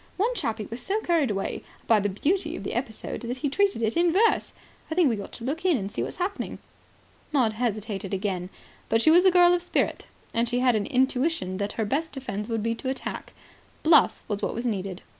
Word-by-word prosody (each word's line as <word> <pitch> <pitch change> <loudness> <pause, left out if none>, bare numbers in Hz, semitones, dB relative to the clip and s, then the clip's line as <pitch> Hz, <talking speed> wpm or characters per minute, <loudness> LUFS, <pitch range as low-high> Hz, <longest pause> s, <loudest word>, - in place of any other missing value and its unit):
One 445 +6 +1
chappie 220 - -2
was 235 +2 -4
so 405 +3 0
carried 330 - +2
away 195 -2 -2 0.2
by 225 -2 +5
the 205 0 0
beauty 320 - 0
of - - -7
the - - -4
episode 235 -3 -4
that 245 +1 -4
he 285 +2 -1
treated 395 - +1
it 220 0 +1
in 340 0 +3
verse. 430 +6 +3 0.4
I 320 - -3
think 340 -5 +4
we 215 -3 -2
ought - - -9
to 230 - -9
look 300 +8 -3
in 360 -6 +3
and 200 -2 -4
see - - -3
what's - - -3
happening." 380 +2 -3 0.7
Maud 250 -7 +2
hesitated 215 -4 -3
again. 190 -2 -2 0.4
But 225 - +3
she 315 - +6
was 350 +3 +6
a 375 - +7
girl 355 0 +6
of 355 - +1
spirit. 355 - -1 0.3
And 230 +1 +1
she 245 - 0
had 250 -1 +3
an 205 -2 0
intuition 260 - +1
that 205 +1 -2
her 220 - -1
best 305 +9 -1
defence 230 -6 -5
would 225 -2 -1
be 230 - 0
attack. 260 +3 -4 0.5
Bluff 310 -2 +5
was 205 -2 -2
what - - -2
was 235 +2 -4
needed. 195 -5 -3
245 Hz, 220 wpm, -26 LUFS, 210-330 Hz, 0.7 s, a